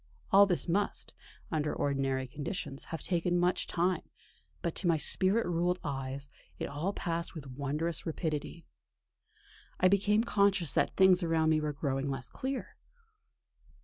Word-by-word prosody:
All 200 +1 +8
this 180 -1 +1
must, 200 +4 -1 0.4
under 155 -2 0
ordinary 135 -2 0
conditions, 140 +2 -5
have 165 - -6
taken 175 0 +1
much 175 +1 +1
time, 180 0 +1 0.6
but 170 - -1
to 185 - 0
my 165 -2 +4
spirit 190 +8 +2
ruled 175 +1 +1
eyes 135 -1 -4 0.3
it - - -3
all 150 +7 -2
passed 170 -3 -3
with 140 -4 -8
wondrous 150 +5 -2
rapidity.... 160 0 -3 1.1
I 185 - +5
became 205 +3 +3
conscious 200 - +2
that - - +1
things 190 -1 +6
around 165 -2 +2
me 155 -1 +3
were 150 0 -1
growing 140 -1 -2
less 135 -2 -4
clear. 265 0 -5
165 Hz, 145 wpm, -31 LUFS, 145-185 Hz, 1.1 s, All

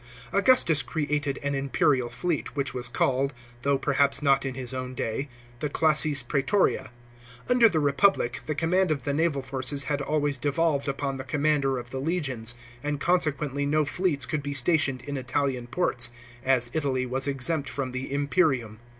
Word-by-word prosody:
* - - -18
Augustus 200 - +5
created 145 -3 -2
an 145 0 -1
imperial 135 -2 +1
fleet, 145 +6 -3
which 140 -1 -2
was 125 -1 -3
called, 135 +2 0 0.3
though 140 +1 +2
perhaps 140 0 +1
not 140 -1 +3
in 130 -2 -3
his 130 -1 -3
own 130 0 -5
day, 125 +5 -3 0.3
the 150 - -2
classis 150 -2 +3
prgetoria. 140 - +1 0.6
Under 245 -2 +6
the 165 -5 0
Republic 145 -3 +2
the 155 - -1
command 180 +4 +2
of 150 -3 -1
the 140 - -1
naval 150 -3 +1
forces 135 +1 -1
had 145 +1 -1
always 145 -1 -1
devolved 145 +1 0
upon 140 0 -2
the 130 - -5
commander 145 -3 +1
of 120 0 -7
the 130 - -4
legions, 135 -8 -2 0.3
and 145 0 -2
consequently 150 -5 0
no 150 +1 +2
fleets 145 -3 0
could 155 +2 -2
be 145 0 -4
stationed 135 -2 +1
in 145 -1 -4
Italian 130 -1 -1
ports, 130 -4 0 0.3
as 125 -3 +2
Italy 135 -5 0
was 130 +2 -3
exempt 140 +2 -1
from 135 -2 -3
the 130 +1 -5
imperium. 140 - +1
140 Hz, 170 wpm, -26 LUFS, 130-155 Hz, 0.6 s, Under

